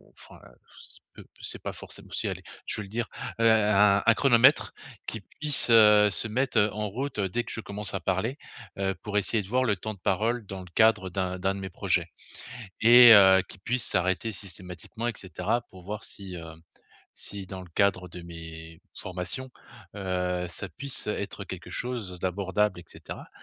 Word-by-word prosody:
enfin, -, -, -15 dB
heu, -, -, -18 dB, 0.2 s
c -, -, -14 dB
c'est -, -, -16 dB
pe -, -, -28 dB
c'est -, -, -1 dB
pas -, -, -3 dB
forcém -, -, -9 dB
si -, -, -1 dB
allez, -, -, -5 dB, 0.2 s
je -, -, -1 dB
vais -, -, -5 dB
le 100 Hz, -, -12 dB
dire. 115 Hz, +2 st, -3 dB, 0.3 s
Heu 115 Hz, -, +6 dB
un 105 Hz, -2 st, +4 dB
un 115 Hz, -, +6 dB
chronomètre, 130 Hz, +2 st, +4 dB, 0.3 s
qui 110 Hz, -, -5 dB
puisse, 145 Hz, -, +1 dB
heu, 105 Hz, -2 st, +7 dB
se 100 Hz, -, +3 dB
mettre, 125 Hz, +2 st, -1 dB
heu, 105 Hz, -1 st, +2 dB
en 105 Hz, 0 st, -3 dB
route 125 Hz, +3 st, -4 dB
dès 100 Hz, +5 st, -1 dB
que -, -, -8 dB
je 115 Hz, -, -3 dB
commence 105 Hz, -1 st, -4 dB
à 95 Hz, -, -3 dB
parler, 95 Hz, -, -1 dB, 0.4 s
heu, 95 Hz, -1 st, 0 dB
pour 105 Hz, -1 st, -2 dB
essayer 105 Hz, +2 st, +1 dB
de -, -, -12 dB
voir 130 Hz, +3 st, +2 dB
le 105 Hz, -4 st, +2 dB
temps 110 Hz, +4 st, -5 dB
de 100 Hz, -, -17 dB
parole 110 Hz, +5 st, 0 dB
dans 95 Hz, 0 st, -7 dB
le 90 Hz, -, -12 dB
cadre 110 Hz, -4 st, +4 dB
d'un 95 Hz, 0 st, -3 dB
d'un 95 Hz, +1 st, 0 dB
de -, -, -6 dB
mes 95 Hz, -, -5 dB
projets. -, -, 0 dB, 0.7 s
Et 120 Hz, +1 st, +9 dB
heu 95 Hz, -2 st, +7 dB
qui -, -, -12 dB
puisse 120 Hz, +5 st, 0 dB
s'arrêter 95 Hz, +5 st, 0 dB
systématiquement, 95 Hz, +3 st, -7 dB
et 120 Hz, -, -1 dB
cetera, 95 Hz, +5 st, -2 dB
pour 95 Hz, -1 st, -14 dB
voir 105 Hz, +2 st, -5 dB
si 95 Hz, -2 st, -7 dB
heu, 85 Hz, -, -8 dB, 0.8 s
si 100 Hz, -2 st, -7 dB
dans 95 Hz, 0 st, -8 dB
le 90 Hz, -, -13 dB
cadre 95 Hz, -2 st, +1 dB
de 90 Hz, 0 st, -10 dB
mes 80 Hz, -1 st, -10 dB
formations, 90 Hz, +8 st, -5 dB, 0.5 s
heu 90 Hz, -2 st, -2 dB
ça 100 Hz, +3 st, -6 dB
puisse 135 Hz, +9 st, -1 dB
être 100 Hz, -1 st, -4 dB
quelque 90 Hz, -2 st, -9 dB
chose 115 Hz, -8 st, -4 dB
d'abordable, 95 Hz, +1 st, 0 dB
et -, -, -16 dB
cetera. -, -, -10 dB
100 Hz, 195 wpm, -27 LUFS, 95-115 Hz, 0.8 s, Et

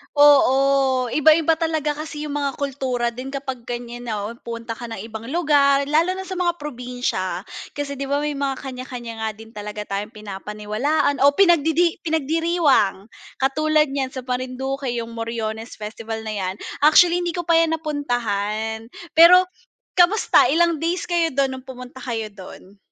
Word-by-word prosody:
Oo. 275 Hz, -3 st, +4 dB
Iba-iba 315 Hz, +3 st, +4 dB
talaga 315 Hz, -2 st, 0 dB
kasi 300 Hz, 0 st, -6 dB
'yong 295 Hz, -, -5 dB
mga 280 Hz, -1 st, 0 dB
kultura 260 Hz, -4 st, -2 dB
din 255 Hz, +3 st, -7 dB
kapag 265 Hz, -3 st, -6 dB
ganiyan 240 Hz, 0 st, -6 dB
na, 220 Hz, -, -2 dB
oh, 215 Hz, -, -4 dB, 0.2 s
pumunta 230 Hz, 0 st, -5 dB
ka 240 Hz, +1 st, -6 dB
ng 225 Hz, -3 st, -6 dB
ibang 225 Hz, 0 st, -8 dB
lugar, 285 Hz, -3 st, +3 dB
lalo 320 Hz, +6 st, +1 dB
na 380 Hz, -, -5 dB
sa 375 Hz, -1 st, -6 dB
mga 345 Hz, -1 st, +1 dB
probinsya. 250 Hz, -, -4 dB, 0.3 s
Kasi 280 Hz, -1 st, -4 dB
'di 275 Hz, -, -3 dB
ba 285 Hz, +1 st, 0 dB
may 300 Hz, -, -1 dB
mga 275 Hz, -1 st, -2 dB
kaniya-kaniya 250 Hz, -3 st, -7 dB
nga 220 Hz, 0 st, -1 dB
din 225 Hz, 0 st, -13 dB
talaga 210 Hz, -1 st, -6 dB
tayong 205 Hz, +2 st, -5 dB
pinapaniwalaan 210 Hz, +8 st, -2 dB
o 285 Hz, +1 st, +5 dB
pinagdidi 340 Hz, -2 st, +3 dB
pinagdiriwang. 315 Hz, -, +1 dB, 0.2 s
Katulad 305 Hz, +2 st, +1 dB
niyan 270 Hz, -1 st, -3 dB
sa 260 Hz, -, -5 dB
Marinduque 255 Hz, +2 st, -3 dB
'yong 235 Hz, -1 st, -3 dB
Moriones 225 Hz, 0 st, -4 dB
Festival 220 Hz, +1 st, -6 dB
na 215 Hz, -, -4 dB
'yan. 190 Hz, -2 st, -3 dB, 0.2 s
Actually, 340 Hz, +4 st, +6 dB
hindi 345 Hz, -1 st, -2 dB
ko 350 Hz, -, -2 dB
pa 335 Hz, -1 st, +4 dB
'yan 325 Hz, -1 st, +2 dB
napuntahan. 225 Hz, -7 st, -2 dB, 0.2 s
Pero 345 Hz, +3 st, +8 dB, 0.6 s
kamusta? 365 Hz, +5 st, +5 dB
Ilang 335 Hz, +1 st, +2 dB
days 335 Hz, +3 st, -1 dB
kayo 340 Hz, -1 st, +3 dB
do'n 270 Hz, -1 st, 0 dB
no'ng 260 Hz, -, -20 dB
pumunta 250 Hz, 0 st, -10 dB
kayo 225 Hz, -4 st, -4 dB
do'n? 195 Hz, 0 st, -13 dB
270 Hz, 160 wpm, -22 LUFS, 230-305 Hz, 0.6 s, Pero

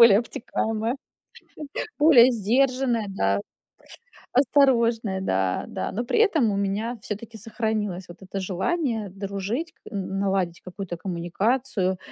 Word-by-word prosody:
более 220 Hz, -4 st, +9 dB
обтекаемая, 225 Hz, 0 st, -2 dB, 1.0 s
более 265 Hz, -5 st, +8 dB
сдержанная, 245 Hz, +1 st, +1 dB
да, 100 Hz, -, +1 dB, 0.9 s
осторожная, 235 Hz, -7 st, +3 dB
да, 95 Hz, -, 0 dB
да. -, -, -4 dB
Но 235 Hz, +5 st, -2 dB
при 450 Hz, -, +1 dB
этом 320 Hz, -, +4 dB
у -, -, -1 dB
меня 210 Hz, +5 st, -1 dB
всё-таки 220 Hz, +2 st, -6 dB
сохранилось 215 Hz, -4 st, -2 dB
вот 175 Hz, -, -12 dB
это 190 Hz, +1 st, -5 dB
желание 215 Hz, -, -1 dB
дружить, 200 Hz, -, -4 dB
к -, -, -38 dB
н 195 Hz, -1 st, -3 dB
наладить 190 Hz, -3 st, 0 dB
какую-то 185 Hz, -1 st, -6 dB
коммуникацию, 190 Hz, +4 st, -1 dB
215 Hz, 120 wpm, -25 LUFS, 190-240 Hz, 1.0 s, более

